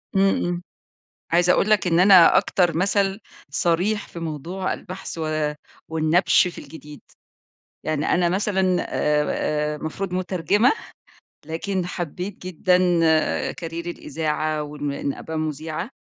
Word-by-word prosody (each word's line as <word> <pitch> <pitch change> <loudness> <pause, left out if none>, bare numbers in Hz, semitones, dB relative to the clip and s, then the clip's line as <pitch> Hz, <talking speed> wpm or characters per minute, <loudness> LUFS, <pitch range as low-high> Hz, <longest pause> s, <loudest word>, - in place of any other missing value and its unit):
امم، 195 -1 +3
امم. 175 0 -2 0.7
عايزة 175 +1 +4
أقول 215 - +1
لَك 210 -3 +3
إن 170 0 +3
أنا 185 -3 +7
أكتر 175 -4 +1
مَثَل 195 +2 +1 0.3
صَريح 180 +8 0
في - - -9
موضوع 165 +4 -4
البحث 185 -2 -8
و 155 -1 -1 0.3
والنَّبْش 165 +3 +3
في - - -10
الجديد. 150 0 -12 0.8
يعني 155 -1 -1
أنا 175 -1 +2
مثلًا 190 -1 +1
آآ، - - -4 0.9
آآ، - - -6
المفروض 180 +5 -5
مُترجمة، 185 - +2 0.7
لكن 180 +3 -3
حبِّيت 180 +2 -5
جدًا 180 +1 +2 0.8
Career - - -13 0.3
الإذاعة 155 -1 -2
وإ 150 0 -9
إنّ 140 -1 -2
أبقي 160 0 -6
مذيعة، 155 - -4
175 Hz, 125 wpm, -23 LUFS, 155-185 Hz, 0.9 s, أنا